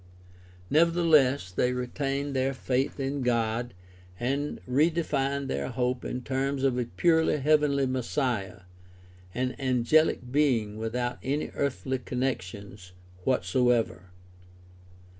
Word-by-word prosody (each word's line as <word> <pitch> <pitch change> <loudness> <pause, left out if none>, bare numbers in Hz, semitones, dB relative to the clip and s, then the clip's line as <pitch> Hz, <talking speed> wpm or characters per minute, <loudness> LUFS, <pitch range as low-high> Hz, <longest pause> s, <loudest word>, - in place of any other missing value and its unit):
Nevertheless 155 - +3
they 125 +7 +1
retained 135 +3 -2
their 130 +1 0
faith 130 +2 -1
in 135 +1 -2
God 120 -2 0 0.4
and 140 +4 -2
redefined 140 -1 +1
their 70 - -2
hope 125 0 -1
in 125 0 -4
terms 135 +1 -1
of 135 -2 +2
a 125 - 0
purely 160 +5 +2
heavenly 145 -1 +3
Messiah, 125 -7 -2 0.7
an 125 +1 -1
angehc 130 0 +2
being 120 -8 +1
without 120 +2 -2
any 145 +3 -2
earthly 130 -1 -2
connections 100 -8 -4 0.3
whatsoever. 115 -2 +1
130 Hz, 105 wpm, -28 LUFS, 120-140 Hz, 0.7 s, Nevertheless